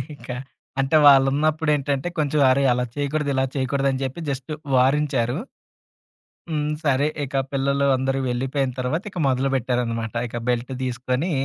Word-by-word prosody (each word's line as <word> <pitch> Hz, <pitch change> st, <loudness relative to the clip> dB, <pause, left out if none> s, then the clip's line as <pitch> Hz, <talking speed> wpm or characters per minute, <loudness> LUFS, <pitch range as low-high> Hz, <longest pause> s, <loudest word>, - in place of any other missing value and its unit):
ఇంక -, -, -15 dB, 0.5 s
అంటే, 135 Hz, +3 st, +3 dB
వాళ్ళున్నప్పుదేంటంటే 145 Hz, +1 st, +3 dB
కొంచెం, 150 Hz, 0 st, +1 dB
"అరేయ! 135 Hz, +1 st, +3 dB
అలా 125 Hz, 0 st, 0 dB
చేయకూడదు, 145 Hz, +1 st, -1 dB
ఇలా 130 Hz, 0 st, +1 dB
చేయకూడదు" 135 Hz, +1 st, 0 dB
అని 130 Hz, 0 st, -3 dB
చెప్పి 135 Hz, +5 st, -4 dB
జస్ట్ 135 Hz, +1 st, -4 dB, 0.2 s
వారంచారు. 130 Hz, -1 st, +2 dB, 1.1 s
హ్మ్. 150 Hz, -2 st, -1 dB, 0.2 s
సరే, 140 Hz, -1 st, +2 dB, 0.2 s
ఇక 140 Hz, +1 st, -8 dB, 0.2 s
పిల్లలు 140 Hz, +1 st, +1 dB
అందరూ 135 Hz, +1 st, -1 dB
వెళ్ళిపోయిన 130 Hz, +2 st, -1 dB
తర్వాత 130 Hz, +8 st, -1 dB
ఇక 185 Hz, -, -6 dB
మొదలుపెట్టారనమాట. 125 Hz, -4 st, 0 dB
ఇక 120 Hz, -, -6 dB
బెల్ట్ 125 Hz, +2 st, -1 dB
తీసుకొని 130 Hz, +6 st, -1 dB
135 Hz, 130 wpm, -23 LUFS, 130-145 Hz, 1.1 s, అంటే